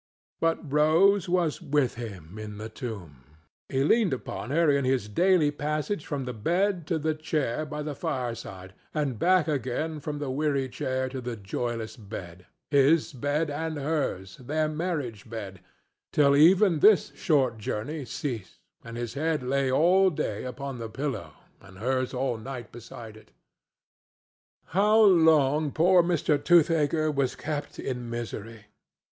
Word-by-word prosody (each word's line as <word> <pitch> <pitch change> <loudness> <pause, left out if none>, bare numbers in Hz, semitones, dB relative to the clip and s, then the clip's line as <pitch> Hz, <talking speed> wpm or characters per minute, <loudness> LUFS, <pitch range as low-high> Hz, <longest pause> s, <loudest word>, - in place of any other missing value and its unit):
But 165 -3 -1
Rose 175 +6 +4
was 175 -4 +1
with 140 -3 +1
him 100 -5 -8
in 105 -1 -7
the 110 +1 -6
tomb. 100 - -8 0.5
He 135 0 +1
leaned 205 - +3
upon 125 -1 -5
her 165 +4 +2
in 140 -1 +2
his 130 -4 0
daily 170 - +3
passage 150 +4 -3
from 140 -3 -3
the 125 - -4
bed 175 - 0
to 165 - 0
the 155 +1 0
chair 155 -2 -2
by 150 0 -5
the 150 0 -4
fireside, 115 - -5 0.2
and 140 -7 -1
back 180 -2 +3
again 150 +2 -2
from 145 0 -5
the 145 -2 -3
weary 140 -1 0
chair 130 +1 -2
to 130 0 -6
the 120 -1 -4
joyless 110 +2 -4
bed—his 110 - -1
bed 145 +4 -1
and 160 +1 -3
hers, 140 - -2
their 155 +5 -1
marriage 150 - -4
bed—till 110 +7 -2
even 175 +3 +5
this 210 +5 +5
short 130 -8 +1
journey 135 +9 -4
ceased 120 -6 -5 0.3
and 115 0 -8
his 120 -1 -4
head 155 0 -1
lay 135 +1 0
all 180 +7 +4
day 110 - -3
upon 130 0 -6
the 115 -1 -5
pillow 130 - -4 0.3
and 95 0 -15
hers 130 +4 -1
all 125 -3 -2
night 120 -1 -7
beside 115 -1 -10
it. 110 - -17 1.4
How 210 +3 +4
long 160 -7 +5
poor 180 +4 +5
Mr. 170 -4 +1
Toothaker 160 -2 +3
was 135 -3 0
kept 145 -1 -5
in 125 -2 -4
misery! 115 -2 -6
140 Hz, 145 wpm, -27 LUFS, 120-155 Hz, 1.4 s, even